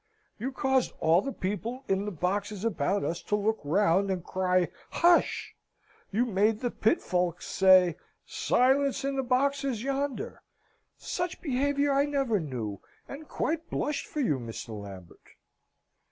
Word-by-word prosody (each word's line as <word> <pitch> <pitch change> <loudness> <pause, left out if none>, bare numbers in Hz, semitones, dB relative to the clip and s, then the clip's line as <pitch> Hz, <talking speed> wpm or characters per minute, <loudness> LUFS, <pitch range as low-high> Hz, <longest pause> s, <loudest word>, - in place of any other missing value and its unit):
"You 255 +5 -3
caused 265 -1 +1
all 165 +3 +4
the 275 - -4
people 225 +6 -4
in 195 +1 0
the 210 - -3
boxes 200 +4 -2
about 195 -1 0
us 170 - -2
to 210 - -1
look 215 +2 0
round 190 +4 +2
and 185 -3 -2
cry 185 -2 +1 0.2
'Hush!' 345 0 +2 0.6
You 225 +5 +2
made 215 0 +1
the 245 -2 -1
pit 225 +11 +1
folks 180 -1 -1
say, 185 -3 +5 0.3
'Silence 270 +2 +2
in 275 0 -1
the 270 - +1
boxes, 265 -1 0
yonder!' 275 0 -3 0.6
Such 355 -1 -3
behaviour 285 0 +1
I 280 +1 +3
never 275 -7 0
knew, 120 - -5 0.3
and 295 +2 -9
quite 325 +1 -2
blushed 295 -1 -2
for 300 - -3
you, 150 - +1
Mr. 115 0 -7
Lambert!" 100 -4 -9
215 Hz, 145 wpm, -28 LUFS, 180-275 Hz, 0.6 s, say